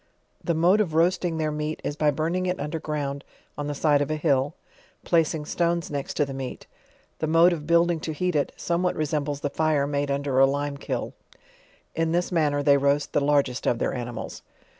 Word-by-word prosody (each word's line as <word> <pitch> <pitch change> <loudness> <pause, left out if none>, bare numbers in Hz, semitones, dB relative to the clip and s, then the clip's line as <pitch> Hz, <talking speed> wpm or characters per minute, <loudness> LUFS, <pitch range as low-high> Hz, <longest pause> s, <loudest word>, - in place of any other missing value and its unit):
The 170 - 0
mode 180 +6 +4
of 165 -7 -2
roasting 170 0 +2
their 155 -1 0
meat, 150 +1 -3
is 145 - -3
by 150 0 +2
burning 165 +5 -1
it 180 0 -1
under 150 +2 -3
ground 145 -2 -3 0.3
on 145 0 -4
the 145 - -3
side 145 0 +3
of 145 - -1
a 155 - 0
hill, 145 -1 +1 0.5
placing 160 -2 +1
stones 170 +1 -1
next 140 -2 -4
to 145 - +2
the 135 - -7
meat; 135 -1 -6 0.5
the 155 - -1
mode 165 +3 +5
of 150 -3 -6
building 170 0 +3
to 160 - -4
heat 180 +3 -1
ii, 145 - +2
somewhat 175 +1 -1
resembles 150 -2 -2
the 145 - -2
fire 155 -3 +1
made 145 0 -1
under 140 -1 0
a 135 - +7
lime 140 +1 -2
kiln. - - -4 0.8
In 165 0 0
this 175 +2 0
manner 150 -4 +1
they 140 -1 +5
roast 140 +1 +1
the - - +2
lar 145 0 +4
gest 125 -2 -6
of 120 - +2
their - - -1
animals. 120 -2 -6
150 Hz, 205 wpm, -25 LUFS, 140-165 Hz, 0.8 s, a